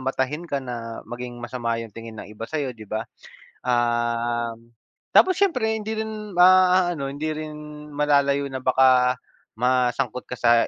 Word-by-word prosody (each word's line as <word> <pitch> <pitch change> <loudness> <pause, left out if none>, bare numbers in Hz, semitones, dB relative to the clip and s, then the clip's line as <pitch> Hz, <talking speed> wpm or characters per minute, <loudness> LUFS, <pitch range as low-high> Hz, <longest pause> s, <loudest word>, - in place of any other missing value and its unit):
matahin 135 +4 -2
ka 140 - 0
na 115 -2 -6
maging 120 0 -6
masama 120 -1 -2
'yung 115 -3 -8
tingin 115 -1 -9
ng - - -13
iba 110 +1 -6
sa'yo, 145 -5 -2
di 110 - -10
ba? 110 +2 -2 0.6
Um, 120 -1 0 0.5
tapos 370 0 +6
siyempre 255 - +2
hindi 220 +1 -4
rin 215 -2 -5
maaano 180 -4 +5
hindi 155 +3 -3
rin 155 0 -6 0.4
malalayo 140 -1 +2
na 130 - -3
baka 130 -1 +4 0.4
masangkot 125 +1 0
ka 125 - -5
sa 115 0 +4
130 Hz, 145 wpm, -24 LUFS, 120-155 Hz, 0.6 s, tapos